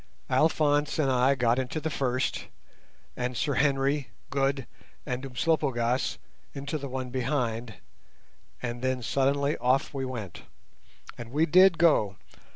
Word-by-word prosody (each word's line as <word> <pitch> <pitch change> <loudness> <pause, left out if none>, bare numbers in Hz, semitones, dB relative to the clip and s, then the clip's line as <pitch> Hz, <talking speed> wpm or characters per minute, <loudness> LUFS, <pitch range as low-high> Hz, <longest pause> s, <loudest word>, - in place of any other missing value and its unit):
Alphonse 145 +1 +2
and 140 -4 +2
I 130 +2 +3
got 120 -1 +2
into 130 +4 -2
the 155 +1 -3
first, 130 -2 -1 0.7
and 125 -1 -3
Sir 145 - 0
Henry, 135 -1 +1 0.2
Good, 135 -1 0 0.4
and 125 +1 -3
Umslopogaas 130 -2 0 0.4
into 140 +3 -4
the 140 -1 -6
one 130 -1 -4
behind, 120 -4 -2 0.9
and 120 0 -4
then 130 -1 -1
suddenly 140 +4 +1
off 130 +4 +1
we 135 -1 -3
went. 115 -9 -6 0.8
And 120 -1 -7
we 155 +4 +3
did 185 +2 +6
go! 145 - +3
135 Hz, 130 wpm, -28 LUFS, 125-145 Hz, 0.9 s, did